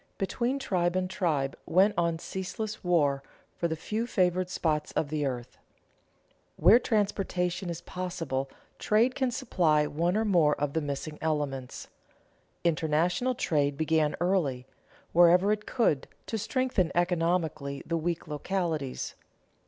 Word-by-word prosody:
Between 240 +7 -1
tribe 180 -9 0
and 185 0 +1
tribe 165 -8 -1
went 195 +4 +4
on 170 -2 +1
ceaseless 200 +5 -5
war 145 -6 +2 0.3
for 170 - 0
the 160 - -2
few 215 +8 -3
favored 180 -3 +1
spots 155 -4 -1
of 145 - 0
the 150 -2 -1
earth. 125 -2 -6 1.0
Where 195 +9 +6
transportation 195 -5 -1
is 170 0 -5
possible, 165 -7 -3 0.3
trade 230 +4 +3
can 260 -1 0
supply 175 - +2
one 170 +6 0
or 220 - +1
more 170 -7 +4
of 145 -1 -1
the 160 - 0
missing 145 +1 -5
elements. 145 -5 -2 0.8
International 170 +9 +1
trade 145 -8 0
began 155 -1 +1
early, 165 -9 0 0.5
wherever 175 +4 +6
it 210 0 -2
could, 160 - +1 0.2
to 225 - -3
strengthen 235 - 0
economically 165 -5 0
the 170 - -1
weak 170 +1 -2
localities. 155 -3 -2
175 Hz, 130 wpm, -29 LUFS, 150-190 Hz, 1.0 s, Where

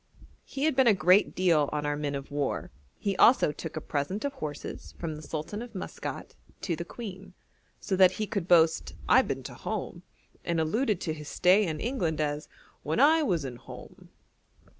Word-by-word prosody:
He 275 - -5
had 310 -3 +2
been 265 -1 +4
a 215 - +6
great 185 +3 +4
deal 165 -6 +3
on 150 -1 -2
our 145 0 0
men 145 -1 -3
of 140 +1 -7
war; 145 -1 -2 0.3
he 200 -2 -2
also 240 - +6
took 155 +2 -7
a - - -3
present 155 - -3
of 280 - -2
horses 155 - -7
from 165 -2 -4
the 150 - -9
Sultan 155 +7 -5
of 240 -3 -9
Maskat 185 - -6 0.3
to 175 - -1
the 170 - -5
Queen, 190 -2 -9 0.4
so 190 - -2
that 185 -1 +6
he 215 - -2
could 195 -4 -3
boast 165 -2 +3
'I - - +7
been - - -4
to - - -8
Home,' - - -5 0.4
and 170 -1 -1
alluded 210 +5 +1
to 160 - -2
his 150 -1 -8
stay 185 +3 +4
in 155 -2 -3
England 180 - -1
as 150 0 -2 0.3
'when 155 +7 -1
I 315 +4 +6
was 175 - 0
in 125 -2 -6
Home.' - - -12
175 Hz, 195 wpm, -28 LUFS, 150-210 Hz, 0.4 s, I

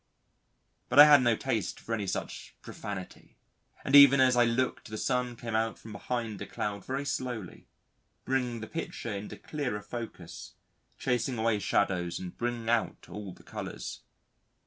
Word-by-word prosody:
But - - -1
I 145 - +13
had 145 -2 +8
no 120 -2 +3
taste - - -2
for 115 - -5
any 105 -3 -2
such 95 - -5
profanity, 95 -3 -8 0.5
and 140 - +3
even 140 -1 +9
as 130 -1 +5
I 120 0 +5
looked 120 0 -1
the 110 - -5
sun 125 0 -1
came 115 -1 -6
out 110 0 0
from 110 - -12
behind 110 0 -4
a - - -5
cloud 100 -2 -4
very 135 +2 -3
slowly, 125 -8 -4 0.6
bringing 125 -3 -1
the 110 - -6
picture 135 -8 -5
into 100 +1 -6
clearer 125 -9 -4
focus, 105 -6 -8 0.4
chasing 125 0 -1
away 110 -1 +1
shadows 90 -4 0
and 90 -1 -7
bringing 120 -1 -3
out 115 -1 0
all 105 -2 -7
the - - -16
colours. - - -6
115 Hz, 160 wpm, -30 LUFS, 105-125 Hz, 0.6 s, I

